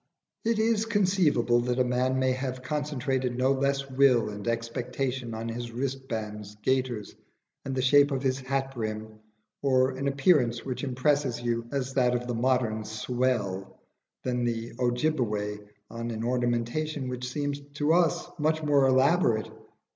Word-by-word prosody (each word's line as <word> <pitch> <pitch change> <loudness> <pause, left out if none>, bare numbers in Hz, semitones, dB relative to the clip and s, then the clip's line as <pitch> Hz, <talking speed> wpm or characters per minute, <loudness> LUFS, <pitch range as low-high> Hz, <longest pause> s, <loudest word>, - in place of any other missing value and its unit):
It 230 0 +1
is 220 0 +2
conceivable 180 - +3
that 125 +1 -1
a 130 - +4
man 125 +1 +1
may 130 0 +2
have 130 0 -3
concentrated 130 -3 -1
no 130 +1 +3
less 140 0 0
will 130 -4 +4
and 105 +1 -7
expectation 120 +1 -2
on 115 +1 -4
his 120 +1 -5
wristbands, 115 -5 -4
gaiters, 130 -5 -1 0.5
and 135 -1 -4
the 130 - 0
shape 145 +2 +6
of 135 -2 -2
his 130 0 +1
hat 135 +1 -2
brim, 110 -2 -5 0.4
or 130 -1 +3
an 135 +1 -3
appearance 135 -4 +2
which 130 0 -4
impresses 130 -1 +1
you 115 -1 -2
as 135 -2 -2
that 125 -2 +3
of 120 0 -2
the 120 - -2
modern 120 -2 +1
"swell," 110 -3 -2 0.4
than 125 -1 -1
the 115 -1 -2
Ojibbeway 120 -5 0 0.3
on 115 +1 -4
an 110 -1 -4
ornamentation 125 +4 -1
which 125 0 -4
seems 145 +1 -2 0.2
to 150 +1 +2
us 175 0 +2
much 155 +1 +1
more 145 -2 +4
elaborate. 130 -3 +3
130 Hz, 150 wpm, -28 LUFS, 120-140 Hz, 0.5 s, shape